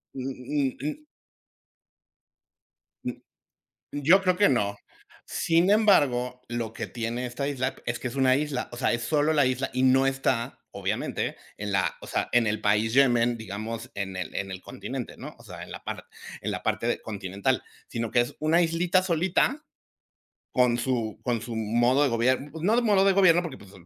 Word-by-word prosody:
Mm 130 - -4
mm 135 +1 -2
mm. 155 - -4 2.0
M - - -4 0.7
yo 165 +7 +4
creo 185 -1 +2
que 205 - +5
no. 100 -6 +1 0.5
Sin 170 +3 +2
embargo, 125 - +3
lo 120 -2 -3
que - - -5
tiene 120 +1 -3
esta 125 +3 -3
isla 130 -1 -2
es 120 0 -1
que 125 - -2
es 120 - -8
una 130 -1 +4
isla, 145 -3 -2
o - - -7
sea, 120 - +1
es 120 0 -1
solo 150 +4 +2
la 145 -4 +4
isla 130 +1 -1
y 130 - 0
no 130 +1 +5
está, 135 -3 -1
obviamente, - - -2 0.2
en 105 0 -4
la, 95 -1 +1
o - - -10
sea, - - -1
en 120 -2 +4
el 110 - -1
país 105 +2 +2
Yemen, 120 -3 +4
digamos, 110 +1 -6
en 95 -1 -4
el 95 - -5
en 95 - -3
el 95 -1 -6
continente, - - -6
¿no? - - -9
O - - -16
sea, - - -9
en - - -10
la - - -9
par - - -5 0.4
en - - -3
la - - -4
parte - - 0
continental. 100 -2 -2 0.3
Sino 115 -1 -3
que 120 - +4
es 120 - -2
una 165 +3 +3
islita 175 +3 +2
solita 185 - +1 0.9
con 125 -2 +3
su 120 -3 -2
con 120 -3 0
su 115 0 -6
modo 120 +5 +2
de 140 - +3
gobier 130 +5 +1
pues, 160 +2 -8
no 210 +5 +3
de 245 - +3
modo 200 -4 +4
de 195 - +5
gobierno 185 -3 +5
porque, 170 -3 -6
pues, 100 -1 -15
130 Hz, 190 wpm, -27 LUFS, 115-155 Hz, 2.0 s, que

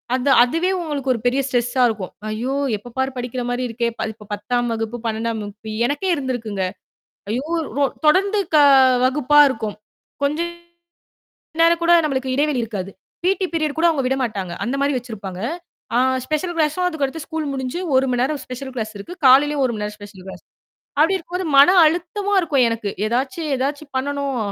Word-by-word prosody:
அந்த 260 +2 0
அதுவே 330 +9 0
உங்களுக்கு 285 -5 -2
ஒரு 235 - -4
பெரிய 255 +3 +2
ஸ்ட்ரெஸ்ஸா 245 0 0
இருக்கும். 205 -5 -5 0.2
ஐயோ! 240 +5 -2 0.2
எப்ப 240 +4 -13
பாரு 265 +1 0
படிக்கிற 245 0 -4
மாரி 245 +1 -1
இருக்கே! 235 +1 -1 0.2
இப்ப 210 -1 -16
10ஆம் 240 +4 -1
வகுப்பு, 225 +1 -3
12ஆம் 225 0 -2
வகுப்பு 205 +2 -9 0.2
எனக்கே 290 +8 -2
இருந்திருக்குங்க. 240 -8 -3 0.7
ஐயோ 250 +6 -2 0.3
ரொ 285 - +4 0.2
தொடர்ந்து 390 +6 +3 0.2
க - - +7 0.5
வகுப்பா 295 +2 +3
இருக்கும். 220 -5 -4 0.5
கொஞ்சம் 315 +5 0 1.1
நேரம் 335 0 +4
கூட 340 +1 +5
நம்மளுக்கு 265 -3 -2
இடைவெளி 290 -1 +1
இருக்காது. 200 -4 -5 0.3
பி.டி 380 +1 +1
பீரியட் 310 -3 -1
கூட 340 - +4
அவுங்க 295 -5 0
விடமாட்டாங்க. 230 -9 -2
அந்த 245 +4 -2
மாரி 285 +1 +2
வச்சிருப்பாங்க. 205 -7 -7 0.6
ஆ - - +4 0.3
ஸ்பெஷல் 310 +4 -1
கிளாஸும் 315 +3 +1
அதுக்கடுத்து 315 -2 -3
ஸ்கூல் 320 -2 -3
முடிஞ்சு 265 +3 -3 0.2
1 260 +1 +4
மணி 245 -1 0
நேரம் 285 +2 -1
ஸ்பெஷல் 260 +1 -7
கிளாஸ் 220 -2 -3
இருக்கு. 270 - -8
காலையிலேயும் 280 +2 +5
ஒரு 255 - +1
1 - - -4
மணி 210 - -3
நேம்ர 210 0 -5
ஸ்பெஷல் 205 -3 -12
கிளாஸ். 190 - -9 0.6
அப்படி 325 +6 +4
இருக்கும்போது 360 +2 -5
மன 280 +5 +8 0.2
அழுத்தமா 355 +5 -1
இருக்கும் 290 -7 +2
எனக்கு. 230 -3 -3 0.2
ஏதாச்சும் 270 +8 -2
ஏதாச்சும் 285 +3 -3
பண்ணணும். 280 0 -2
265 Hz, 165 wpm, -21 LUFS, 230-305 Hz, 1.1 s, மன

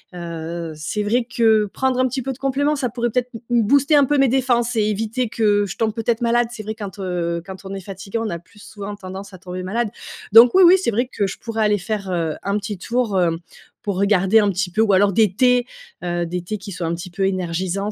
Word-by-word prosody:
Heu, 170 -1 -5
c'est 160 +7 -3
vrai 235 +4 +1
que 220 -3 +3
prendre 260 -1 0
un 255 - +3
petit 260 +2 -3
peu 270 +2 -3
de 255 - -7
compléments, 280 +2 0
ça 270 -3 0
pourrait 240 +1 -2
peut-être 250 +2 -1
m 230 - -7
m 235 -1 +4
booster 280 +6 +3
un 285 -1 +6
peu 290 +2 +1
mes 270 -2 +4
défenses 245 -2 +1
et 215 - +3
éviter 225 +4 -1
que 205 -2 +2
je 195 - -6
tombe 220 -1 0
peut-être 230 +1 -1
malade. 240 0 +2
C'est 230 -3 -7
vrai, 215 +1 -5
quand, 205 -2 -8
heu, 175 -3 -2
quand 190 +1 -10
on 190 - -6
est 195 - -5
fatigué, 195 +4 -6
on 225 -1 -2
a 170 - -4
plus 195 +5 -22
souvent 205 -1 -7
tendance 195 0 -9
à - - -9
tomber 180 0 -7
malade. 220 +5 -1 0.4
Donc 230 - +8
oui, 380 - +7
oui, 350 +2 +8
c'est 335 - 0
vrai 240 +4 0
que 200 - 0
je 195 - -6
pourrais 225 -1 -1
aller 210 0 +3
faire, 200 +1 -4
heu, 165 -3 -1
un 200 +1 -1
petit 205 0 -5
tour, 230 +1 -1
heu, 175 -2 +3 0.5
pour 200 -3 -3
regarder 200 +1 +4
un 205 -1 +3
petit 185 -1 -2
peu 205 - -4
ou 215 -3 +3
alors 200 +1 +4
des 210 -1 +3
thés, 250 +1 +3 0.4
heu, 175 0 -1
des 180 +2 -3
thés 215 +4 -4
qui 200 0 -9
sont 175 -2 -4
un 165 +1 -1
petit 175 +2 -8
peu 190 +2 0
énergisants, 185 +2 -2
210 Hz, 255 wpm, -21 LUFS, 185-235 Hz, 0.5 s, Donc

